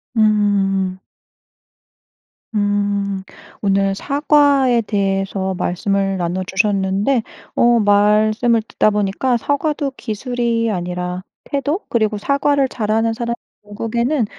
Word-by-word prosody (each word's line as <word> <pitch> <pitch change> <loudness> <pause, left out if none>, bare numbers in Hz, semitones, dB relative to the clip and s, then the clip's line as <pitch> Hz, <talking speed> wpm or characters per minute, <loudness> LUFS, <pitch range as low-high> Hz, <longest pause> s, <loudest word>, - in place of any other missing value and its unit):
음. 200 -3 +2 1.6
음. 205 -1 0 0.4
오늘 195 -1 +1
사과에 280 -2 +3
대해서 195 -2 -1
말씀을 195 +2 -1
나눠 180 +1 -2
주셨는데 200 +5 +1 0.3
어 240 0 +4
말씀을 215 +3 +3
듣다 - - +2
보니까 210 +5 0
'사과도 285 +2 -1
기술이 235 0 -1
아니라 180 0 -4 0.2
태도? 285 +5 -1
그리고 215 -2 +1
사과를 280 +4 +1
잘하는 225 0 0
사람이 235 +1 -3 0.3
결국에는 235 +5 -1
210 Hz, 230 characters per minute, -18 LUFS, 195-240 Hz, 1.6 s, 어